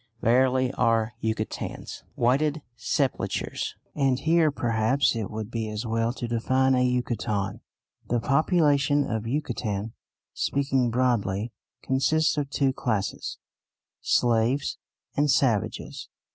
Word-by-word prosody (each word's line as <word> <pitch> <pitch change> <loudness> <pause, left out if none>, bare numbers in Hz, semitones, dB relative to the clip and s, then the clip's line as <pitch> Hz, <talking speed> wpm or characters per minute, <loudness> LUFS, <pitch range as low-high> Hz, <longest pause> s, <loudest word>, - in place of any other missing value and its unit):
Verily 130 +2 +3
are 115 -1 +1
Yucatecans 110 -1 -4
"Whited 145 +5 +1
Sepulchres"! 125 +3 -2 0.2
And 135 -3 +2
here 160 +2 +3
perhaps 120 0 +1
it 110 -4 -3
would 110 0 -5
be 115 -2 -2
as 105 +2 -4
well 115 +1 0
to 120 - -5
define 130 +3 +2
a 125 0 +3
Yucatecan. 115 -5 -1 0.5
The 120 - +2
population 145 +1 +3
of 110 0 -3
Yucatan, 115 -6 -2 0.4
speaking 135 -3 +1
broadly, 115 -3 0 0.3
consists 155 +4 +2
of 140 -1 -3
two 135 -1 +1
classes, 110 -6 -2 0.6
slaves 120 +4 +1 0.4
and 145 +1 +2
savages. 130 -8 0
125 Hz, 110 wpm, -26 LUFS, 115-140 Hz, 0.6 s, Verily